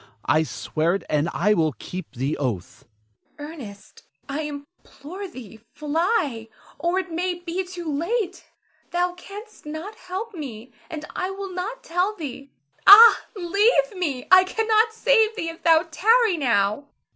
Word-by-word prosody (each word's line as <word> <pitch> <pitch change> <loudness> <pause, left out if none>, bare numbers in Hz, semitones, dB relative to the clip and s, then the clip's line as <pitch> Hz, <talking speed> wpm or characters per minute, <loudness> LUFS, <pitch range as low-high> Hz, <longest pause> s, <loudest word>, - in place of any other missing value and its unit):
I 155 - +3
swear 160 +2 -1
it, 195 - -4
and 150 +2 +1
I 205 +6 +2
will 160 -6 +1
keep 185 - -8
the 135 +5 -1
oath. 120 -11 -4 0.5
Zara. 295 +1 -7
Ernest, 205 -10 -12 0.3
I 285 +2 -3
implore 300 +4 -9
thee, 230 - -12 0.2
fly, 300 - -1 0.3
or 345 +2 0
it 375 -2 -3
may 355 +2 -1
be 350 +2 -4
too 360 -1 -8
late. 365 +6 -2 0.5
Thou 355 0 0
canst 405 +1 -12
not 315 +8 -6
help 400 +3 -7
me, 250 - -8 0.2
and 305 -1 -6
I 365 - -2
will 390 -1 -6
not 425 +8 -5
tell 360 +5 -1
thee. 280 -5 -7 0.4
Ah, 445 +3 +10
leave 415 +6 +2
me! 290 -9 -3
I 370 0 +9
cannot 445 +3 +2
save 445 -1 +2
thee 330 -7 -3
if 330 - -10
thou 330 0 +4
tarry 445 +3 +3
now. 230 -3 +1
340 Hz, 150 wpm, -23 LUFS, 265-390 Hz, 0.5 s, Ah